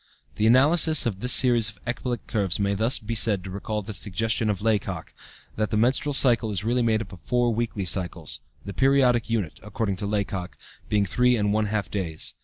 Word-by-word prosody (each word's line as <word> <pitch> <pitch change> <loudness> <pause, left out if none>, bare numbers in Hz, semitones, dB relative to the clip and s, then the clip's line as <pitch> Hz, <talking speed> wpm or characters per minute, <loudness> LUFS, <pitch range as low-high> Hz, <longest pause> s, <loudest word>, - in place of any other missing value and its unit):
The 110 - +2
analysis 155 +5 +5
of 105 -5 -2
this 125 +4 0
series 120 -4 +4
of 100 - -13
ecbolic 120 0 -4
curves 100 -4 -1
may 100 0 +1
thus 110 +5 +2
be 110 +2 -5
said 105 -4 +1
to 95 - -8
recall 105 +2 -4
the 110 +2 -7
suggestion 110 +2 -1
of 100 -3 -1
Laycock, 100 -6 -2 0.4
that 110 -1 0
the 105 - -1
menstrual 130 +6 +1
cycle 120 -4 +3
is 100 -3 -2
really 120 +3 +1
made 115 -1 +1
up 100 - -15
of 90 - -11
four 120 +5 0
weekly 110 -3 -2
cycles, 90 -4 -3 0.3
the 100 - -6
periodic 130 0 +2
unit, 105 -9 -2
according 105 -2 -3
to 100 +1 -4
Laycock, 100 -3 -3 0.3
being 105 -1 +2
three 125 +6 +2
and 105 -2 0
one 110 0 +1
half 105 -1 -3
days. 85 -6 -3
110 Hz, 205 wpm, -25 LUFS, 100-120 Hz, 0.4 s, analysis